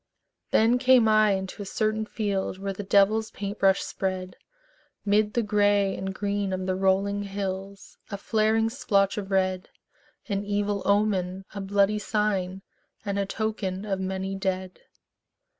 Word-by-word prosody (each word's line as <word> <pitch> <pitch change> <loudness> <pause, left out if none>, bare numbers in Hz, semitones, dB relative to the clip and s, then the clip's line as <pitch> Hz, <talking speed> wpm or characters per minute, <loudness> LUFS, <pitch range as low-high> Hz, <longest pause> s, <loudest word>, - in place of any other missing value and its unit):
Then 235 +3 +4
came 255 -3 +5
I 215 -1 +5
into 190 +1 -4
a - - -5
certain 215 +1 -1
field 200 -4 -2
Where 195 0 -4
the 195 - -6
devil's 205 +3 +3
paint 200 +1 -6
brush 195 0 +3
spread 185 -1 -3 0.7
'Mid 210 +1 +2
the 235 - +2
gray 205 -2 +2
and 190 0 -4
green 200 0 -2
of 185 0 -3
the 185 0 0
rolling 195 +2 +1
hills 195 0 -6
A 200 - -4
flaring 220 +2 +1
splotch 200 -5 +1
of 195 -1 -7
red, 185 -1 0 0.6
An 200 -1 -1
evil 205 0 -1
omen, 195 -2 +1
a 200 - -5
bloody 200 +2 +2
sign, 195 -2 -1 0.4
And 200 0 -1
a 200 - -1
token 205 -2 -3
of 195 -2 -2
many 190 0 -3
dead. 190 -1 -3
200 Hz, 150 wpm, -26 LUFS, 190-210 Hz, 0.7 s, came